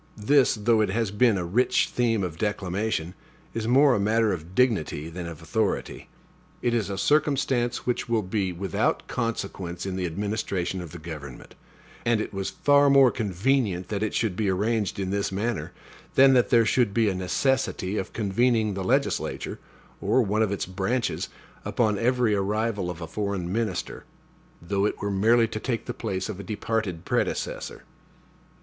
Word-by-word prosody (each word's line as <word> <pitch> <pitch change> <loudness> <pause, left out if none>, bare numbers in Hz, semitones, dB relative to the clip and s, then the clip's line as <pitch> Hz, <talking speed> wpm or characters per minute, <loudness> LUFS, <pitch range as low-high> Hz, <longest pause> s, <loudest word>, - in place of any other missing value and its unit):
This, 130 +6 +3
though 110 +1 +2
it 105 - +1
has 110 0 0
been 105 0 +3
a 90 - -2
rich 115 +9 +2
theme 115 -4 +1
of 85 -3 -5
declamation, 100 -3 -2 0.4
is 115 -1 -3
more 135 +3 +5
a - - +1
matter 110 +1 +2
of 85 +1 -7
dignity 95 - +1
than 85 0 -6
of 85 -1 -9
authority. 110 +3 -2 0.5
It 120 - +1
is 115 -4 0
a 100 - -3
circumstance 135 -1 +1
which 125 -1 -1
will 115 -2 +1
be 95 0 -1
without 90 0 -1
consequence 100 -7 -3
in 95 -1 -3
the 90 -1 -1
administration 95 0 -2
of 85 -4 -8
the 85 - -8
government; 75 -5 -9 0.5
and 115 -2 +2
it 110 - -4
was 95 -1 -2
far 145 0 +4
more 135 -2 +6
convenient 105 -3 0
that 105 -1 -2
it 110 - -1
should 110 -5 0
be 105 0 0
arranged 105 +2 0
in 95 -1 -2
this 100 0 -1
manner, 105 +4 -2 0.4
than 135 0 +7
that 125 -2 +3
there 115 -3 +5
should 115 -3 +2
be 115 -2 +3
a 100 - +1
necessity 100 +2 0
of 95 - -5
convening 110 +1 +1
the 95 0 -3
legislature, 95 - -1 0.4
or 130 - +3
one 105 +1 0
of 110 -3 +2
its 100 - -2
branches, 95 +6 -2 0.3
upon 105 -4 0
every 125 -2 +2
arrival 105 -1 -1
of 85 -1 -6
a 80 - -5
foreign 95 -1 -3
minister, 115 0 -2 0.6
though 100 +4 -1
it - - -4
were 100 - -2
merely 115 +4 +4
to 110 -1 -5
take 115 0 -3
the 120 - -4
place 100 -6 -3
of 105 -3 -6
a - - -6
departed 105 -4 -3
predecessor. - - -2
105 Hz, 175 wpm, -26 LUFS, 95-115 Hz, 0.6 s, than